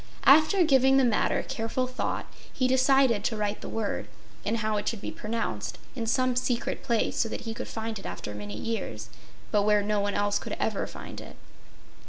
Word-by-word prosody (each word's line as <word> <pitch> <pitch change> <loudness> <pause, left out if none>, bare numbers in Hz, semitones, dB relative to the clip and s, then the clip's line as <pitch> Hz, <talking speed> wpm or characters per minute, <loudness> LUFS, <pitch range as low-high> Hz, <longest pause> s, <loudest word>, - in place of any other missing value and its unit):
After 315 +7 +7
giving 270 -3 +5
the 270 - +5
matter 235 -4 +2
careful 230 +3 -1
thought, 255 0 -3 0.3
he 255 - +1
decided 260 -4 +4
to 220 - 0
write 210 0 -2
the - - -6
word, 220 -2 -2 0.4
and 220 +2 0
how 215 -1 0
it 205 - -3
should 225 - -1
be - - -5
pronounced, 230 +2 -3 0.2
in 230 -3 -3
some 255 +2 +2
secret 245 -1 -1
place, 230 -2 0
so 225 - +2
that - - -4
he 225 -1 -4
could 250 +2 -6
find 220 -1 -4
it - - -12
after 105 - -6
many 105 0 -6
years, 225 - -4 0.4
but 210 - +4
where 210 0 +3
no 210 0 +1
one 200 0 -1
else 205 0 +1
could - - -5
ever - - -1
find - - -8
it. - - -11
225 Hz, 200 wpm, -28 LUFS, 210-255 Hz, 0.4 s, After